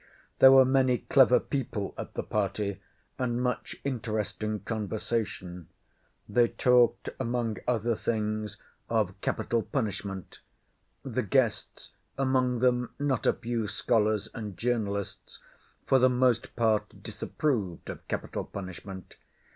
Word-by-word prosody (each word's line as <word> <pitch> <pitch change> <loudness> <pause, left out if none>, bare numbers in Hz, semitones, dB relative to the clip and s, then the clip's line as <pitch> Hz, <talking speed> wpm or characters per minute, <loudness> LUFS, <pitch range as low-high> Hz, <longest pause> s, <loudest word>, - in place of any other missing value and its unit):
There 130 - +10
were 135 -1 +8
many 130 -1 +3
clever 125 -1 +5
people 115 -7 -3
at - - -7
the - - -2
party 100 -1 -2 0.4
and 120 -2 0
much 125 0 -2
interesting 110 -4 -2
conversation. 105 -5 -3 0.6
They 120 -1 +4
talked 125 0 +3
among 120 -3 -1
other 120 -1 +1
things 105 -2 -2 0.3
of 110 -4 +1
capital 115 - 0
punishment. 100 - -4 0.6
The - - -1
guests, - - 0 0.3
among 130 -2 +1
them 125 -1 +2
not 140 -4 0
a - - +5
few 115 -2 -3
scholars 110 -1 +1
and 105 -5 -6
journalists, 105 -4 -2 0.5
for 135 - +4
the 130 +1 +5
most 125 -2 +1
part 110 -2 0
disapproved 110 - -2
of - - -8
capital - - -3
punishment. 95 -1 -8
115 Hz, 115 wpm, -29 LUFS, 105-125 Hz, 0.6 s, There